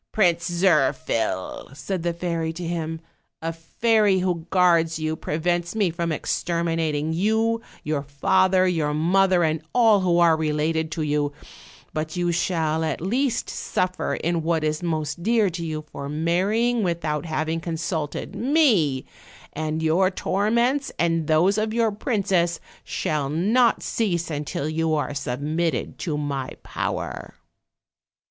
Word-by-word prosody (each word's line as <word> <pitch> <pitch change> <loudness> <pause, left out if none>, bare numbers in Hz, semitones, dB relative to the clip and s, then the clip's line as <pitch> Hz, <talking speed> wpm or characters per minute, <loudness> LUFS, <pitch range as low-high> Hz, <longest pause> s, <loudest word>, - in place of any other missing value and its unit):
"Prince 175 -4 +2
Zirphil," 135 - 0
said 165 +7 -3
the 170 +1 0
fairy 170 -1 -2
to 175 +1 -6
him, 165 -1 -3 0.4
"a 165 +1 -3
fairy 210 +4 +2
who 180 -3 -1
guards 170 -3 +3
you 155 0 -2
prevents 175 +4 -1
me 200 -6 +2
from 170 0 -2
exterminating 165 -2 -1
you, 220 +5 +1 0.2
your 150 -1 -1
father, 185 +7 +2
your 155 -4 0
mother, 180 +3 +3
and 155 -1 0
all 225 -4 +6
who 180 -2 +2
are 170 -2 +5
related 160 +1 0
to 160 - -2
you; 145 -1 0 0.6
but 155 0 -3
you 175 -1 0
shall 160 -2 0
at 155 -3 -1
least 245 - 0
suf 185 0 -2
fer - - -1
in 170 0 -1
what 160 -1 0
is 155 +1 -1
most 155 -2 -2
dear 220 -1 +2
to 170 0 -5
you 155 -1 -4
for 140 0 -6
marrying 195 +10 +1
without 165 -4 -1
having 160 +1 -1
consulted 160 -2 -3
me, 230 - +2 0.5
and 155 +1 -2
your 175 +4 +3
torments, 235 +9 0
and 165 -2 +1
those 180 +7 +3
of 215 +1 -1
your 230 -2 +2
princess, 195 -6 0 0.2
shall 150 -3 -2
not 215 - +2
cease 175 -7 -1
until 145 -1 -3
you 160 0 0
are 145 -1 -1
submitted 145 +2 -2
to 155 -4 -2
my 140 -3 -3
power." - - -4
165 Hz, 140 wpm, -24 LUFS, 155-185 Hz, 0.6 s, all